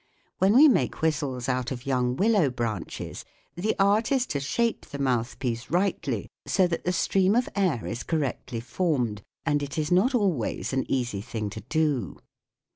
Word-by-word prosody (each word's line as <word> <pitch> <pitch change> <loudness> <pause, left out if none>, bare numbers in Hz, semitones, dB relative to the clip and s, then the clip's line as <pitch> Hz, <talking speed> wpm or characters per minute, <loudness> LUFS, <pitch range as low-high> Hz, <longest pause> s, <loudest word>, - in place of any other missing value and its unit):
When 195 +3 +4
we 295 +5 +9
make 205 - +1
whistles 140 -6 0
out 125 -2 0
of 125 0 -6
young 125 -2 +1
willow 200 -4 +3
branches 115 -7 -4 0.3
the 185 +8 -1
art 205 +4 +3
is 260 -2 +3
to 140 - 0
shape 230 +12 -1
the 140 - -7
mouth 125 -3 0
piece 120 -2 -3
rightly 170 - 0 0.2
so 190 - +3
that 170 -2 -2
the 180 - +2
stream 190 +3 +2
of 245 +1 +2
air 180 - +1
is 120 - -4
correctly 135 -6 -2
formed, 120 - -1 0.2
and 145 -2 +1
it 145 +1 -5
is 155 +1 -1
not 210 +9 +4
al 205 -5 +3
ways 115 -3 -3
an 130 - -1
easy 120 -6 -1
thing 105 -1 -4
to 110 - -7
do. 155 -6 0
145 Hz, 180 wpm, -26 LUFS, 125-190 Hz, 0.3 s, we